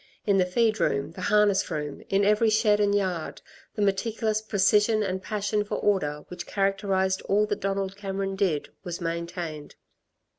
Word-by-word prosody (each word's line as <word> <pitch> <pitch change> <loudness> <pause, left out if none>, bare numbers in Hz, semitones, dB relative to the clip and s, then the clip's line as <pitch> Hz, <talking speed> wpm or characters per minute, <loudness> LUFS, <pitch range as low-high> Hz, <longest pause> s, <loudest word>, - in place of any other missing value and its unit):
In 200 -2 +3
the 180 - +3
feed 220 +3 +1
room, 140 +3 0
the 185 - -9
harness 210 -2 +3
room, 150 -4 -4
in 195 +1 +2
every 210 +2 +4
shed 215 -1 +3
and 205 -1 +2
yard, 185 -5 -2 0.3
the 210 - 0
meticulous 215 +2 0
precision 210 +1 +3
and 190 -1 -2
passion 210 0 -1
for 205 - -4
order 150 -8 0
which 180 -1 -8
characterised 195 -1 0
all 210 +2 +3
that 205 -1 -3
Donald 195 -1 -2
Cameron 195 -1 -3
did, 185 -7 0
was 175 -2 -5
maintained. 170 -2 -5
195 Hz, 160 wpm, -26 LUFS, 180-210 Hz, 0.3 s, every